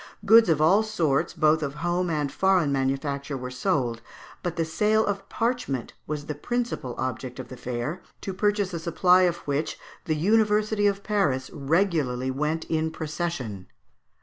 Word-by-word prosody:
Goods 225 0 +7
of 160 -2 +3
all 175 +7 +5
sorts, 170 -13 0
both 155 -1 +3
of 145 -1 -3
home 175 +2 -1
and 150 -3 -1
foreign 185 -6 +2
manufacture, 140 +1 -1
were 125 0 -6
sold, 125 -5 -1 0.4
but 175 -1 -3
the 165 - 0
sale 215 +7 +2
of 200 -1 -3
parchment 230 - -2
was 150 -1 -4
the 150 - -3
principal 230 - -3
object 130 0 -4
of 130 - -7
the 130 - -8
fair, 125 +7 -4 0.2
to 195 - -4
purchase 205 -1 0
a 170 - -2
supply 180 +3 +4
of 170 - -4
which 145 +2 -1 0.3
the 155 - 0
University 210 +3 +2
of 200 0 -1
Paris 150 -12 0
regularly 145 -5 0
went 150 +4 -1
in 160 0 0
procession. 155 - -4
160 Hz, 160 wpm, -26 LUFS, 135-195 Hz, 0.4 s, Goods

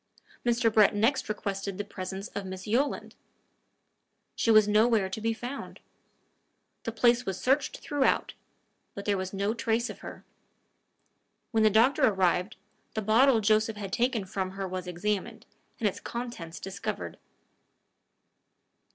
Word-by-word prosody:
Mr. 235 -2 +2
Brett 215 -2 +5
next 225 +4 +1
requested 200 -2 -3
the 205 - -2
presence 190 0 -6
of 200 - -5
Miss 190 0 -7
Yolland. 255 +7 0 1.2
She - - 0
was 215 -2 +7
nowhere 215 -1 +3
to 205 +3 -5
be 225 +1 +1
found. 245 +5 -6 1.1
The 230 - -1
place 240 +2 +3
was 190 -1 -2
searched 270 +2 +1
throughout, 290 -2 0 0.6
but 200 - -6
there 205 - +2
was 190 -1 -3
no 200 +2 -1
trace 230 +1 0
of - - -12
her. - - -10 1.3
When 225 -2 +2
the 215 - +6
doctor 240 +8 +4
arrived, 190 -4 +2 0.4
the 220 - -1
bottle 230 +3 +5
Joseph 215 +1 +2
had 200 -2 -6
taken 240 -4 +1
from 190 0 -3
her 195 0 -4
was 185 0 -5
examined, 210 +5 -3 0.3
and 220 - +2
its 195 - -3
contents 235 -9 -6
discovered. 195 +1 -5
215 Hz, 140 wpm, -28 LUFS, 195-235 Hz, 1.3 s, was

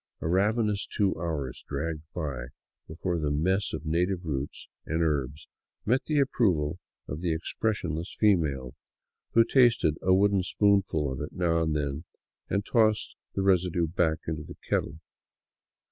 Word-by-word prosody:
A - - -3
rav 100 +6 +3
enous 105 -3 0
two 100 -3 +1
hours 80 -6 -4
dragged 75 +2 -3
by 70 -8 -3 0.4
before 85 +2 -2
the 75 -2 0
mess 95 +7 +1
of 80 0 -5
native 90 +3 0
roots 70 -3 -4 0.2
and 80 +1 -1
herbs 75 -2 -1 0.4
met 125 +4 +2
the 155 - 0
approval 90 - +1 0.3
of 75 +4 -5
the 90 -2 0
expressionless 85 -2 -2
female, 75 - +2 0.6
who 115 - +8
tasted 115 - +3
a 95 - +2
wooden 100 +1 +4
spoonful 95 -7 +2
of 65 - -5
it - - -5
now 85 -2 +1
and 80 -1 0
then 75 +2 -2 0.4
and 100 +1 0
tossed 110 -2 +2 0.2
the 95 - 0
residue 90 -3 +2
back 80 -1 +1
into 80 -1 -3
the 75 - -10
kettle. 80 +3 -1
85 Hz, 150 wpm, -28 LUFS, 75-100 Hz, 0.6 s, who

